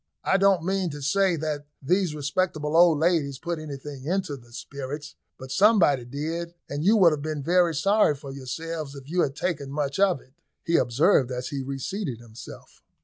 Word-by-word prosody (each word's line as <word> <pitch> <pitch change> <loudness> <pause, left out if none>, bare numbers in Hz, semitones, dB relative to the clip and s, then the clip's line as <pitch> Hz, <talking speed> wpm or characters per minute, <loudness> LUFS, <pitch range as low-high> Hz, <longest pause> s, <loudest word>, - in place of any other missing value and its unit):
"I 190 - +3
don't 195 -3 +3
mean 190 0 0
to 145 -1 -7
say 190 +5 +2
that 150 -2 -4
these 175 +2 +1
respectable 150 +1 -1
old 170 -2 +6
ladies 155 -4 +1
put 170 +3 -4
anything 140 -2 -8
into 180 -2 -1
the 120 -3 -16
spirits, 140 +4 -7 0.2
but 130 0 -9
somebody 185 - +4
did, 165 +6 -4
and 145 +2 -4
you 215 +5 +5
would 180 -5 +6
have 150 -2 -2
been 155 -1 -4
very 175 0 +3
sorry 195 0 +3
for 140 0 -9
yourselves 145 +3 -5
if 135 -1 -11
you 175 +3 +1
had 135 -3 0
taken 145 -5 -2
much 140 +2 -2
of 195 -6 +3
it," 130 - -23 0.3
he 170 - 0
observed, 130 - +3
as 125 0 -4
he 140 -2 -3
reseated 135 - -4
himself. 115 -1 -12
150 Hz, 185 wpm, -26 LUFS, 140-175 Hz, 0.3 s, old